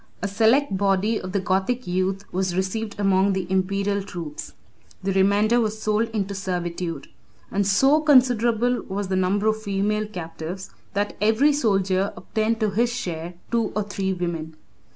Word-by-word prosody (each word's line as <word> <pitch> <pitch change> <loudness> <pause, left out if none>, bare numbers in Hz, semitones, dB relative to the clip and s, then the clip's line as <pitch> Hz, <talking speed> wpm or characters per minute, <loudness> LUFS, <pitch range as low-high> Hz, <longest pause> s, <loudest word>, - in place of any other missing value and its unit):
A - - +1
select 225 +5 +3
body 200 +3 +1
of 185 - -6
the 200 - 0
Gothic 195 +7 0
youth 185 +2 -1
was 185 -1 -1
received 205 +3 -2
among 195 0 +3
the 190 -1 -2
Imperial 200 +2 0
troops; 170 -6 -7 0.5
the 195 - 0
remainder 205 +5 +3
was 215 -1 -2
sold 215 +1 0
into 200 -3 -2
servitude; 175 -3 -3 0.4
and 200 -1 +1
so 270 +10 +4
considerable 245 -4 +3
was 195 0 -3
the 190 - 0
number 185 +3 +1
of 220 0 +1
female 210 +1 -1
captives 175 -1 -7 0.2
that 205 +1 -1
every 225 +8 +4
soldier 195 -7 +1
obtained 220 +1 -1
to 215 -2 +2
his 235 +4 +1
share 175 -7 -4 0.2
two 230 -2 +1
or 210 - +1
three 195 -1 -2
women. 170 -3 -3
200 Hz, 155 wpm, -24 LUFS, 185-220 Hz, 0.5 s, so